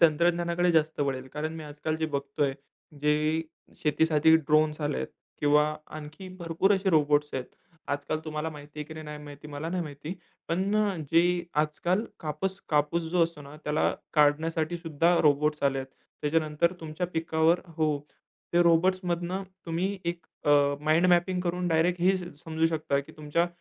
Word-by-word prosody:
तंत्रज्ञानाकडे 170 +2 +3
जास्त 160 -1 +2
वळेल. 135 -2 -1
कारण 155 +3 -4
मी 160 - -7
आजकाल 150 +1 -3
जे 160 - -1
बघतोय 140 -1 -1 0.5
जे 150 +2 +2 0.4
शेतीसाठी 160 0 +4
ड्रोन्स 155 0 +2
आलेत 145 -1 -1 0.3
किंवा 150 0 +5 0.3
आणखी 155 +5 -9
भरपूर 170 +3 +2
असे 195 0 +1
रोबोट्स 150 -2 +3
आहेत. 130 -1 -2 0.4
आजकाल 145 +2 -1
तुम्हाला 155 +1 -3
माहिती 145 0 -11
आहे 150 - -3
की 160 - -10
नाही? 155 - -8
नाही 150 0 -7
माहिती, 145 +1 -10
मला 145 +2 -5
नाही 180 0 -1
माहिती. 150 +3 -6 0.3
पण 190 +5 0
अ, 205 -3 +1 0.2
जे 175 +1 +3 0.2
आजकाल 175 +7 -1 0.2
कापस 165 +5 -3
कापूस 150 +3 +2
जो 175 -1 +3
असतो 165 -2 -7
ना 140 +1 -11
त्याला 150 +1 +1 0.2
काढण्यासाठी 155 +3 +2
सुद्धा 165 +1 +2
रोबोट्स 150 0 +2
आलेत. 135 -1 +1 0.4
त्याच्यानंतर 155 +2 +1
तुमच्या 160 +2 -3
पिकावर 160 +1 +2 0.2
हो. 155 -3 +1 0.5
ते 175 0 +5
रोबोट्समधनं 175 +1 +2 0.2
तुम्ही 185 +4 -1
एक 170 0 -3 0.2
अ, 145 - +3 0.3
माइंड 155 +4 +3
मॅपिंग 180 +1 +3
करून 180 0 -1
डायरेक्ट 170 +2 +2
हे 190 +2 +4
समजू 160 -2 -2
शकता, 155 -3 0
की 140 - -13
तुमच्या 155 +3 0
160 Hz, 155 wpm, -28 LUFS, 150-175 Hz, 0.5 s, किंवा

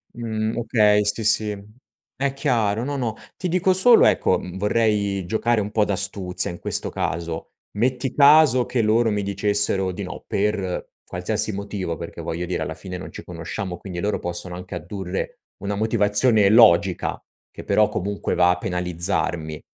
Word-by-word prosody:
Mhmm, 110 -2 -3
okay, 105 -3 +3
sì, 105 +2 +2
sì. 105 -1 +2 0.5
È 135 +1 -1
chiaro, 115 -5 0
no, 140 +2 -3
no, 115 -4 -2 0.2
ti 185 - -3
dico 185 +2 +2
solo 225 +6 +6
ecco, - - +3
mhmm, 90 0 -8
vorrei 105 -2 0
giocare 110 +4 0
un 105 0 -3
po' 105 -1 +2
d'astuzia, 95 -3 -1
in 85 - -9
questo - - -1
caso. 85 -1 -4 0.3
Metti 125 +3 0
caso 140 -3 +6
che 120 -3 0
loro 115 +2 +3
mi 105 -1 -1
dicessero 100 -1 0
di 90 +3 -6
no, 90 - -8
per 100 -3 -2 0.2
qualsiasi 105 +5 -2
motivo; 100 -4 -4
perché, - - -8
voglio 85 +2 -4
dire, 90 0 -3
alla - - -4
fine 90 -1 -6
non - - -9
ci - - -9
conosciamo, 90 +2 -6
quindi 90 -3 -7
loro 105 +4 -1
possono 90 +1 -5
anche 90 0 -8
addurre 90 +2 -5 0.2
una 100 +1 -2
motivazione 105 +1 +2
logica, 95 -5 +4 0.3
che - - -11
però, - - +3
comunque, 100 +2 -3
va 90 0 +4
a 90 - -1
penalizzarmi, 85 -3 -2
105 Hz, 165 wpm, -22 LUFS, 90-110 Hz, 0.5 s, solo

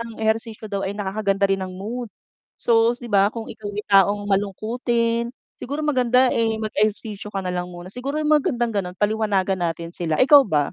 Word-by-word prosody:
ang 230 -1 -7
ehersisyo 220 0 -2
daw 200 -2 -3
ay 195 +1 -3
nakakaganda 200 0 0
rin 195 -1 +1
ng 185 - -4
mood. 230 +5 -5 0.5
So 230 0 +3
'di 245 - -12
ba 200 0 +5
kung 230 0 -6
ikaw 210 - -8
'yung 205 +1 -6
taong 200 +1 +5
malungkutin, 230 +4 0 0.3
siguro 290 +4 -4
maganda 255 -3 +3
eh, 225 -1 +1
mag 215 -1 -4
ehersisyo 210 0 -1
ka 195 -2 -4
nalang 180 -1 -3
muna. 180 +2 -10
Siguro, 275 +4 -4
'yung 305 0 +1
magandang 250 -6 +1
gano'n 185 -3 -3
paliwanagan 205 -3 0
natin 170 0 -3
sila. 165 -3 -2
Ikaw 285 - +7
ba? 145 -4 +1
215 Hz, 185 wpm, -22 LUFS, 195-235 Hz, 0.5 s, Ikaw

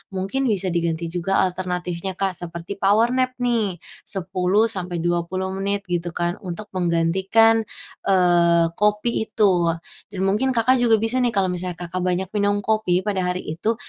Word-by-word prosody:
mungkin 195 +9 -1
bisa 195 -4 +1
diganti 170 -1 -1
juga 180 +2 +1
alternatifnya 180 0 -3
Kak, 195 0 0
seperti 175 +2 -6
power 215 +5 +3
nap 255 0 0
nih, 230 -6 0 0.3
10 190 +3 +1
sampai 180 -3 -3
20 175 +2 -1
menit, 200 +1 -2
gitu 175 -1 -2
kan. 175 0 -1
Untuk 200 +2 -7
menggantikan, 190 +6 +2 0.4
eee, 175 -3 +4
kopi 210 +2 +1
itu. 180 -6 +2 0.3
Dan 190 -1 -4
mungkin 235 +7 +1
Kakak 255 +3 +3
juga 235 -2 +4
bisa 225 +4 +1
nih, 240 -3 +1
kalau 190 -2 +2
misalnya 180 0 -3
Kakak 175 +1 -5
banyak 185 +1 -1
minum 205 -1 0
kopi 195 -5 +1
pada 200 -2 -1
hari 180 0 -2
itu, 190 +9 -2
190 Hz, 155 wpm, -22 LUFS, 175-215 Hz, 0.4 s, eee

